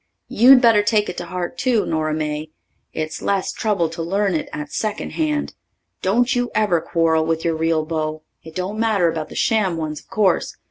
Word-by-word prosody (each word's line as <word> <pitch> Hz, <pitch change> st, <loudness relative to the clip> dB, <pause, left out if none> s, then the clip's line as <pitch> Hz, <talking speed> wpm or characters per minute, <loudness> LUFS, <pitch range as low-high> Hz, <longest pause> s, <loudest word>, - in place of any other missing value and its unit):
You'd 250 Hz, +3 st, +7 dB
better 230 Hz, -4 st, +5 dB
take 210 Hz, 0 st, +1 dB
it 180 Hz, -, -6 dB
to 175 Hz, -, -5 dB
heart 180 Hz, +7 st, -5 dB
too, 245 Hz, -5 st, +2 dB
Nora 155 Hz, -1 st, -1 dB
May. 155 Hz, 0 st, -3 dB, 0.4 s
It's 155 Hz, 0 st, -4 dB
less 195 Hz, -2 st, 0 dB
trouble 205 Hz, -6 st, 0 dB
to 165 Hz, +1 st, -6 dB
learn 195 Hz, +3 st, 0 dB
it 160 Hz, -, -2 dB
at 150 Hz, -, -6 dB
second 215 Hz, -1 st, -3 dB
hand. 300 Hz, -2 st, -1 dB, 0.5 s
Don't 235 Hz, +7 st, +2 dB
you 245 Hz, 0 st, 0 dB
ever 195 Hz, -6 st, +2 dB
quarrel 165 Hz, -1 st, +1 dB
with 165 Hz, +1 st, -1 dB
your 165 Hz, -1 st, +1 dB
real 160 Hz, -1 st, 0 dB
beau 155 Hz, -1 st, -3 dB, 0.2 s
it 160 Hz, 0 st, -13 dB
don't 190 Hz, +4 st, -3 dB
matter 205 Hz, -7 st, +2 dB
about 155 Hz, -1 st, -5 dB
the -, -, -10 dB
sham 200 Hz, -7 st, +1 dB
ones, 155 Hz, -2 st, -4 dB
of -, -, -21 dB
course. 195 Hz, -5 st, +1 dB
175 Hz, 195 wpm, -21 LUFS, 160-215 Hz, 0.5 s, You'd